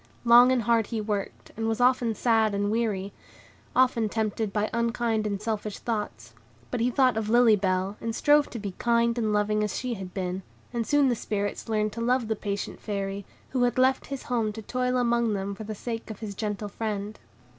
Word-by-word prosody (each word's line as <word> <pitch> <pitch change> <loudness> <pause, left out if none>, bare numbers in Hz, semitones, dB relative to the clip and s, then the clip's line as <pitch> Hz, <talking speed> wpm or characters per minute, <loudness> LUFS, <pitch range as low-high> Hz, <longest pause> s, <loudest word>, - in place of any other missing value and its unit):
Long 240 +2 +8
and 250 -3 +2
hard 230 -1 +2
he 230 - -3
worked, 205 -2 -4
and 225 0 -2
was 225 +1 -1
often 245 -2 +3
sad 220 -3 +2
and 205 +1 0
weary, 210 -4 -1 0.6
often 245 -4 +3
tempted 215 -1 -1
by 210 +1 0
unkind 235 -2 0
and 200 -1 -2
selfish 210 -1 -3
thoughts; 210 - -4 0.4
but - - -1
he 235 +2 +2
thought 255 -2 +3
of 215 -1 -2
Lily 235 -1 +6
Bell, 190 0 -1
and 230 -1 -3
strove 295 0 +4
to - - -6
be 205 -3 -4
kind 235 0 +2
and 220 -2 0
loving 210 0 +1
as 210 - -2
she 250 -1 -2
had 190 -4 -7
been; 185 0 -3 0.3
and 235 -2 -2
soon 290 -1 +4
the 245 - +2
Spirits 205 0 -3
learned 215 -1 0
to 230 - -5
love 240 -1 +1
the 220 - +1
patient 200 -1 -4
Fairy, 200 -1 -4 0.2
who 255 - -1
had 245 0 +2
left 260 +1 +3
his 275 -1 -5
home 230 -3 0
to 220 +1 -8
toil 250 +2 0
among 235 -2 +2
them 195 +1 -3
for 215 +2 -8
the 215 0 -5
sake 225 +2 -5
of 215 - -6
his 210 -2 -6
gentle 210 0 -3
friend. 210 -1 -4
220 Hz, 210 wpm, -27 LUFS, 205-235 Hz, 0.6 s, Long